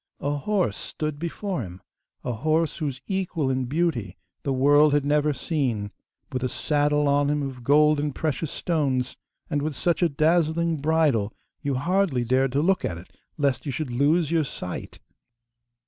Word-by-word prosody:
A 145 Hz, +1 st, 0 dB
horse 175 Hz, -, 0 dB
stood 150 Hz, -2 st, -4 dB
before 170 Hz, +1 st, -3 dB
him 90 Hz, -3 st, -8 dB, 0.4 s
a 125 Hz, -, -2 dB
horse 155 Hz, +6 st, 0 dB
whose 140 Hz, -4 st, -3 dB
equal 180 Hz, -8 st, -1 dB
in 130 Hz, 0 st, 0 dB
beauty 130 Hz, -, -1 dB, 0.2 s
the 140 Hz, -, -2 dB
world 145 Hz, +3 st, +5 dB
had 145 Hz, -1 st, +2 dB
never 150 Hz, +1 st, +2 dB
seen; 125 Hz, -8 st, -2 dB, 0.4 s
with 130 Hz, -1 st, -2 dB
a 130 Hz, -, 0 dB
saddle 150 Hz, +1 st, +1 dB
on 140 Hz, 0 st, +3 dB
him 150 Hz, 0 st, 0 dB
of 130 Hz, -3 st, -6 dB
gold 150 Hz, +3 st, +4 dB
and 145 Hz, -1 st, -2 dB
precious 155 Hz, 0 st, -2 dB
stones, 140 Hz, -8 st, -1 dB, 0.3 s
and 145 Hz, -3 st, -1 dB
with 150 Hz, 0 st, -2 dB
such 175 Hz, +6 st, 0 dB
a 175 Hz, -, +4 dB
dazzling 160 Hz, +2 st, +2 dB
bridle 145 Hz, -8 st, +2 dB, 0.3 s
you 140 Hz, -2 st, -1 dB
hardly 170 Hz, -2 st, +1 dB
dared 130 Hz, +2 st, +2 dB
to 145 Hz, +2 st, +2 dB
look 185 Hz, +1 st, +2 dB
at 85 Hz, -, -2 dB
it, 85 Hz, -, -13 dB, 0.3 s
lest 140 Hz, -1 st, 0 dB
you -, -, -1 dB
should 135 Hz, 0 st, -3 dB
lose 145 Hz, +6 st, +2 dB
your 165 Hz, -2 st, +3 dB
sight. 90 Hz, -10 st, -6 dB
145 Hz, 170 wpm, -25 LUFS, 130-160 Hz, 0.4 s, world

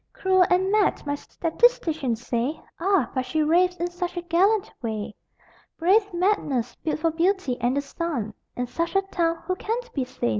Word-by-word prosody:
Cruel 375 Hz, -1 st, +3 dB
and 375 Hz, +2 st, +2 dB
mad, 420 Hz, -6 st, +2 dB
my 285 Hz, -, -1 dB
statisticians 315 Hz, -, 0 dB
say 245 Hz, +6 st, -1 dB, 0.2 s
Ah, 365 Hz, -, +2 dB
but 255 Hz, -, 0 dB
she 305 Hz, +5 st, 0 dB
raves 355 Hz, +4 st, +3 dB
in 350 Hz, 0 st, -3 dB
such 355 Hz, 0 st, -4 dB
a 350 Hz, -, -2 dB
gallant 375 Hz, +5 st, +2 dB
way! 215 Hz, -3 st, -4 dB, 0.6 s
Brave 400 Hz, +5 st, +3 dB
madness, 320 Hz, -, 0 dB
built 310 Hz, -, -2 dB
for 330 Hz, 0 st, +2 dB
beauty 340 Hz, -4 st, +1 dB
and 245 Hz, +3 st, +1 dB
the -, -, +2 dB
sun 280 Hz, -7 st, -3 dB, 0.2 s
In 250 Hz, -, -1 dB
such 335 Hz, +9 st, -3 dB
a 390 Hz, -, +4 dB
town 335 Hz, -3 st, -1 dB
who 370 Hz, -, 0 dB
can 445 Hz, +5 st, -2 dB, 0.2 s
be 270 Hz, -, 0 dB
sane? 255 Hz, -, -2 dB
335 Hz, 180 wpm, -25 LUFS, 265-375 Hz, 0.6 s, a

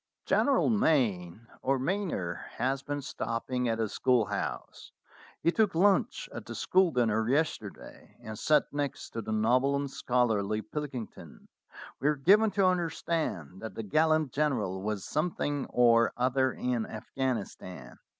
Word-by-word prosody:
"General 275 Hz, -2 st, +3 dB
Mayne 115 Hz, -, +1 dB, 0.2 s
(or 135 Hz, +1 st, +1 dB
Mayner) 130 Hz, -, -2 dB
has 135 Hz, +3 st, -1 dB
been 145 Hz, 0 st, -4 dB
stopping 125 Hz, +1 st, -2 dB
at 115 Hz, -, 0 dB
the 110 Hz, -1 st, 0 dB
schoolhouse. 105 Hz, -3 st, -1 dB, 0.5 s
He 170 Hz, -, +4 dB
took 210 Hz, -2 st, +1 dB
lunch 195 Hz, +3 st, +2 dB
at -, -, -8 dB
the -, -, -6 dB
school 185 Hz, -1 st, +3 dB
dinner 110 Hz, -5 st, +1 dB
yesterday, 135 Hz, -8 st, -3 dB
and 110 Hz, 0 st, -8 dB
sat 155 Hz, -1 st, +3 dB
next 145 Hz, -2 st, -3 dB
to 115 Hz, -, -4 dB
the 110 Hz, -, -6 dB
noble 125 Hz, +6 st, +2 dB
and 140 Hz, -1 st, -2 dB
scholarly 110 Hz, -5 st, 0 dB
Pilkington. 140 Hz, -7 st, -7 dB, 0.5 s
We 140 Hz, -, 0 dB
are 150 Hz, -, +3 dB
given 205 Hz, +10 st, +5 dB
to 195 Hz, -1 st, +3 dB
understand 165 Hz, -, -1 dB
that 110 Hz, -, -7 dB
the 115 Hz, -, -4 dB
gallant 155 Hz, +5 st, +2 dB
general 115 Hz, -11 st, -1 dB
was 105 Hz, -1 st, -3 dB
something 145 Hz, -2 st, -1 dB
or 115 Hz, -2 st, +4 dB
other 130 Hz, +1 st, +2 dB
in 120 Hz, -3 st, -2 dB
Afghanis 120 Hz, 0 st, -3 dB
tan. 80 Hz, -9 st, -10 dB
130 Hz, 140 wpm, -29 LUFS, 110-150 Hz, 0.5 s, given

